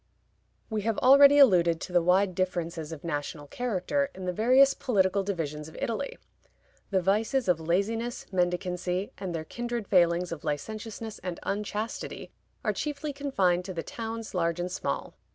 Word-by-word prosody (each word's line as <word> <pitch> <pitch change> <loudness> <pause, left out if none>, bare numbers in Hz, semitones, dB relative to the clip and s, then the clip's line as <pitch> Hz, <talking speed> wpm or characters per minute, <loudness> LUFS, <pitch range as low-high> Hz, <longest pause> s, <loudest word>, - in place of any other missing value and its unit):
We 215 -2 -2
have 225 +1 -1
already 280 +2 +7
alluded 175 - +5
to 180 - -6
the 175 - +5
wide 185 +2 +3
differences 170 -3 -2
of 160 -3 -8
national 145 -2 -4
character 245 - -1
in 190 - -7
the 180 - -1
various 255 +7 +5
political 200 -5 +1
divisions 160 -6 -3
of 160 - -12
Italy. 235 +5 -3 0.7
The 190 -3 +1
vices 220 +6 +1
of 175 -3 +3
laziness, 210 +9 -1
mendicancy, 180 +1 -1
and 180 -3 -4
their 160 -1 -4
kindred 240 +1 -4
failings 175 -1 +3
of 170 - -6
licentiousness 215 +8 -5
and 180 -2 -5
unchastity 210 +2 -4 0.3
are - - +1
chiefly 295 0 -3
confined 195 -11 +1
to 185 -1 -6
the 165 - -3
towns, 225 -1 -6
large 170 -2 0
and 180 +1 -2
small. 185 - -3
190 Hz, 155 wpm, -28 LUFS, 175-225 Hz, 0.7 s, already